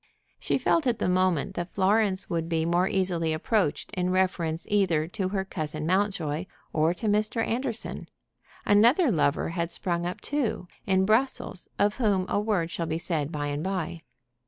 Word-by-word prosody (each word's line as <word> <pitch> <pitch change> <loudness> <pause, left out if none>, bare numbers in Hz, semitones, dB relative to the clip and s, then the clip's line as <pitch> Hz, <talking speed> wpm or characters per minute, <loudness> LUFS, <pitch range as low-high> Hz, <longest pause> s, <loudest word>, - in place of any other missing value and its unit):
She - - 0
felt 320 -5 +2
at 240 -3 +2
the - - -1
moment 185 -1 +1
that 175 -1 -5
Florence 200 0 +2
would 165 -4 -2
be 160 -1 +1
more 175 +2 +2
easily 175 -5 0
approached 180 +1 0
in 180 -2 0
reference 175 -3 0
either 175 -7 +2
to 190 -1 -2
her 190 -1 -2
cousin 155 -4 -4
Mountjoy 180 -3 0 0.3
or 160 +2 +2
to 225 - -6
Mr. 215 +2 +1
Anderson. 235 -1 -3 0.6
Another 240 - +5
lover 150 -4 +1
had 170 0 -2
sprung 175 0 -2
up, 180 - -5
too, 270 -10 -2 0.2
in 190 -1 +3
Brussels, 220 -3 0
of 205 +1 +2
whom 205 -7 +2
a - - +1
word 195 -6 0
shall 170 - -3
be 160 0 -1
said 165 -4 -1
by 145 -2 -3
and 145 +1 -2
by. 180 -3 -3
185 Hz, 170 wpm, -27 LUFS, 165-205 Hz, 0.6 s, Another